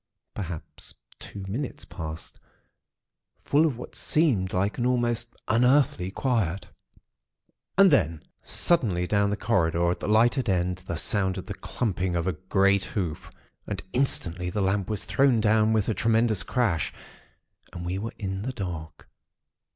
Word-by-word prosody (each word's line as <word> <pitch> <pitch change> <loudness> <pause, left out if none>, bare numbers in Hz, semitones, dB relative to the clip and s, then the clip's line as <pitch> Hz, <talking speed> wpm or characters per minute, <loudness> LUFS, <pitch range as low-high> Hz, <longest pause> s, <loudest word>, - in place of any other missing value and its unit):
Perhaps 90 -5 -6 0.2
two 100 -2 -8
minutes 125 +8 -4
passed, 80 +1 -7 1.1
full 150 +3 +4
of 135 -7 -3
what 125 - -9
seemed 125 - +1
like 100 +5 0
an 120 - +1
almost 120 -1 0
unearthly 125 -2 +3
quiet. 100 -5 -1 1.1
And 195 -2 +7
then, 85 - +2 0.2
suddenly, 105 - +1
down 100 +2 +2
the 100 - -1
corridor, 85 -6 +1
at - - -3
the - - -4
lighted 120 +3 +3
end, 90 -1 0
there 85 - -2
sounded 95 0 +1
the - - -5
clumping 95 -6 -2
of 85 -1 0
a 95 - 0
great 95 +3 +2
hoof; 90 -6 -4 0.4
and - - -4
instantly 90 -9 0
the 95 - -3
lamp 95 +1 0
was 105 -3 -2
thrown 135 -4 +3
down 110 0 +3
with 110 -2 +1
a 110 - +1
tremendous 110 -2 +2
crash, 100 - 0 0.8
and 85 -1 -7
we 90 +2 -2
were 115 +3 -5
in 95 -1 -3
the 130 +5 -3
dark. 85 -8 -6
100 Hz, 145 wpm, -26 LUFS, 90-120 Hz, 1.1 s, And